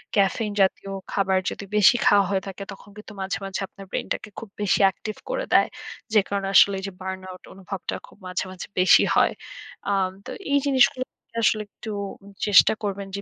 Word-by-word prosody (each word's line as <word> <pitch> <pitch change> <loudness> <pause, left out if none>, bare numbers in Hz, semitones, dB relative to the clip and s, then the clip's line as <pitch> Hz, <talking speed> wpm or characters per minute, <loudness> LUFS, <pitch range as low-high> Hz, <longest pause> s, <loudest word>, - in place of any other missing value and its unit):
caffein 205 +2 +2
জাতীয় 195 +1 +1 0.2
খাবার 190 -1 +2
যদি 200 - -7
বেশি 210 +5 +7
খাওয়া 200 -1 +5
হয়ে 190 -1 +1
থাকে 195 +1 -6
তখন 200 - -15
কিন্তু 210 0 -11
মাঝে, 190 +1 -2
মাঝে 195 0 -4
আপনার 195 - -13
brain - - -3
টাকে - - -7
খুব 225 - -10
বেশি 205 - +2
active 215 +3 -7
করে - - -2
দেয়। - - +6 0.5
যেই 210 -2 +5
কারণে 200 -1 -1
আসলে 200 - +7
এইযে 195 0 -6
burnout 185 -1 -7
অনুভবটা 195 0 -5
খুব - - -19
মাঝে, 180 -1 -2
মাঝে 185 - -8
বেশি 185 - +6
হয়। - - +4 0.6
আম 190 -2 +1
তো - - -7 0.2
এই 285 - +5
জিনিসগুলোর 260 -1 +3 0.2
থেকে 230 - -13
আসলে 215 -1 +3
একটু 220 +1 -8 0.6
চেষ্টা 205 -2 +7
করবেন 200 -1 -3
যে 200 - -4
200 Hz, 185 wpm, -24 LUFS, 190-215 Hz, 0.6 s, বেশি